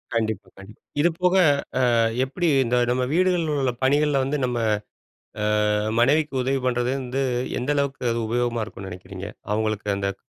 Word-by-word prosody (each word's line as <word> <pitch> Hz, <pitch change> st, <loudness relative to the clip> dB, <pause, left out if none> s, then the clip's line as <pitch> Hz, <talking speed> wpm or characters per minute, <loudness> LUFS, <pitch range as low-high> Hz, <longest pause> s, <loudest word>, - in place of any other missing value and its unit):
கண்டிப்பா, 110 Hz, -3 st, -1 dB
கண்டிப்பா. 100 Hz, +2 st, -14 dB, 0.2 s
இதுபோக 175 Hz, +2 st, +2 dB, 0.6 s
அ -, -, +3 dB, 0.3 s
எப்பிடி 170 Hz, +6 st, -1 dB, 0.2 s
இந்த 120 Hz, +1 st, +1 dB
நம்ம 125 Hz, +1 st, +1 dB
வீடுகள்ல 175 Hz, -3 st, +2 dB
உள்ள 125 Hz, -2 st, +1 dB
பணிகள 145 Hz, +2 st, +3 dB
வந்து 145 Hz, +2 st, -1 dB
நம்ம 120 Hz, -1 st, -1 dB, 1.1 s
ஆ -, -, +2 dB, 0.3 s
மனைவிக்கு 140 Hz, +1 st, +2 dB
உதவி 135 Hz, +1 st, 0 dB
பண்ணுறது 125 Hz, 0 st, +1 dB
வந்து, 130 Hz, +2 st, -2 dB, 0.4 s
எந்த 140 Hz, +4 st, 0 dB
அளவுக்கு 140 Hz, -1 st, -1 dB
அது 115 Hz, 0 st, -1 dB
உபயோகமா 120 Hz, -1 st, 0 dB
இருக்குன்னு 95 Hz, -4 st, -9 dB
நினைக்கிறீங்க? 95 Hz, +2 st, -8 dB, 0.2 s
அவுங்களுக்கு 110 Hz, -1 st, -1 dB
அந்த 100 Hz, 0 st, -2 dB
125 Hz, 145 wpm, -24 LUFS, 110-145 Hz, 1.1 s, அ